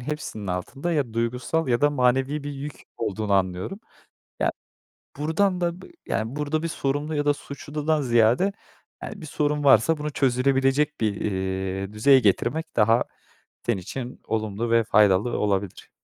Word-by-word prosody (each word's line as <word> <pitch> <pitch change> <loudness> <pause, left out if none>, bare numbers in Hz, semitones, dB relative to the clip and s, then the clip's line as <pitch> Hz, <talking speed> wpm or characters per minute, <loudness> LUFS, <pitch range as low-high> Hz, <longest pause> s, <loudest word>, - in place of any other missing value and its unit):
hepsinin 125 -7 -5
altında 135 - -3
ya 135 -8 -1
duygusal 125 +7 -1
ya 120 -1 +2
da 145 - +4
manevi 135 +2 +1
bir 145 - -3
yük 140 +1 -7
olduğunu 105 -2 -2
anlıyorum. 95 - 0 0.6
Ya, - - +2 0.7
buradan 180 +5 +1
da, 170 -1 +1 0.3
yani, 115 +5 -2
burada 150 +2 -1
bir - - 0
sorumlu 145 0 -2
ya 145 0 0
da 145 - +4
suçludan 145 +3 -3
ziyade, 120 - +3 0.5
yani, 205 -4 -7
bir - - -7
sorun 150 0 -1
varsa 140 +3 +5
bunu 150 0 -3
çözülebilecek 135 +2 +2
bir, 105 -3 0
iii, 95 0 -2
düzeye 130 +6 +6
getirmek 125 - 0
daha 115 +1 +4 0.6
senin 120 -4 +1
için 125 +5 -6
olumlu 110 +1 -2
ve 115 -1 +4
faydalı 105 +2 +3
olabilir. 100 -2 -2
130 Hz, 145 wpm, -25 LUFS, 110-150 Hz, 0.7 s, düzeye